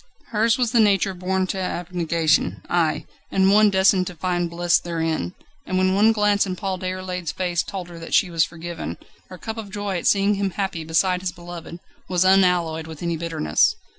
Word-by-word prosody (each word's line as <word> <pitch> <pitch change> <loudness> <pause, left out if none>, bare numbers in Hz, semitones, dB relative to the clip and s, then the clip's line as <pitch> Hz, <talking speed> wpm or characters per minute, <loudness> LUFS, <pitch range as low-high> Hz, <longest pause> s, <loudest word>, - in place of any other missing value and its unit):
Hers 225 +2 +2
was 245 -3 0
the 240 - +3
nature 200 -2 +3
born 185 +1 -1
to 190 +1 -3
abnegation: 170 -3 0
aye! 160 -3 0 0.2
and 190 0 +3
one 210 +1 +6
destined 190 -1 +3
to 180 - -7
find 175 0 -1
bliss 175 +1 +2
therein. 160 - -2 0.3
And 185 - -1
when 185 0 +2
one 210 +3 +5
glance 210 -2 +2
in 185 - -3
Paul 190 -1 -3
Déroulède's 185 -1 -4
face 175 -2 -1
told 185 -3 -6
her 170 -1 -10
that 165 - -2
she 185 - +3
was 165 -2 +3
forgiven, 170 0 -6 0.3
her 185 - -9
cup 220 +4 -6
of 215 -3 -6
joy 205 -2 -3
at - - -2
seeing 200 0 +3
him 200 -1 -1
happy 190 -3 -3
beside 180 +3 +1
his 185 -1 -2
beloved, 175 -1 -9 0.3
was 180 0 +2
unalloyed 180 -4 +3
with 160 0 -9
any 170 -1 -1
bitterness. 160 - +1
185 Hz, 195 wpm, -22 LUFS, 170-195 Hz, 0.3 s, one